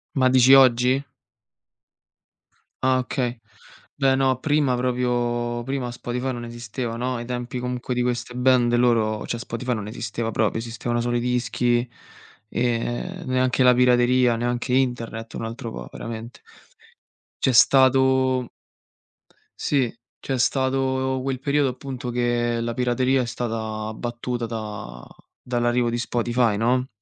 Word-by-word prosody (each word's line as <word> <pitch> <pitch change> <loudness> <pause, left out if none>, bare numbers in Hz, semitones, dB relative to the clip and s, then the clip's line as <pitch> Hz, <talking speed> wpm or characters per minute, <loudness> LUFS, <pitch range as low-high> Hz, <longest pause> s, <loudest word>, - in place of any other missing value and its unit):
Ma 130 -1 +4
dici 130 +1 +6
oggi? 130 +1 +5 1.8
Ah 130 0 +3
okay. 125 -2 -2 0.6
Beh 135 -1 +3
no 130 -1 +1
prima 145 -4 +2
proprio 120 -1 -1
prima 130 -2 -3
Spotify 125 +2 -3
non 120 0 -6
esisteva, 120 0 -5
no, 125 +1 -2
ai 120 0 -5
tempi 125 0 -4
comunque 125 0 -3
di 125 - +1
queste 120 0 -2
band 125 -1 +3
loro 115 -3 +2
cioè 120 - -3
Spotify 120 +2 -3
non 105 -2 -4
esisteva 115 +1 -4
proprio, 110 +1 0
esistevano 120 +1 -3
solo 120 0 -1
i - - +2
dischi, 120 0 0 0.6
ehm, 120 +9 -2
neanche 130 0 +2
la 125 0 +7
pirateria, 125 0 +4
neanche 120 +2 -2
internet, 115 -3 -1
un 115 - -4
altro 115 0 -6
po' - - -7
veramente. 115 +1 -8 1.0
C'è 130 - +3
stato 130 0 +4 1.1
sì, 135 -5 +1 0.3
c'è 135 -2 -3
stato 130 0 0
quel 135 -2 -2
periodo 140 -1 +1
appunto 130 0 -6
che 120 -1 0
la 115 0 -2
pirateria 125 +2 +1
è - - -2
stata 110 -2 -4
battuta 120 +1 -4
da 105 - -6 0.5
dall'arrivo 120 0 +1
di 120 - -2
Spotify, 120 -2 0
no? 125 +3 +1
125 Hz, 130 wpm, -23 LUFS, 120-130 Hz, 1.8 s, la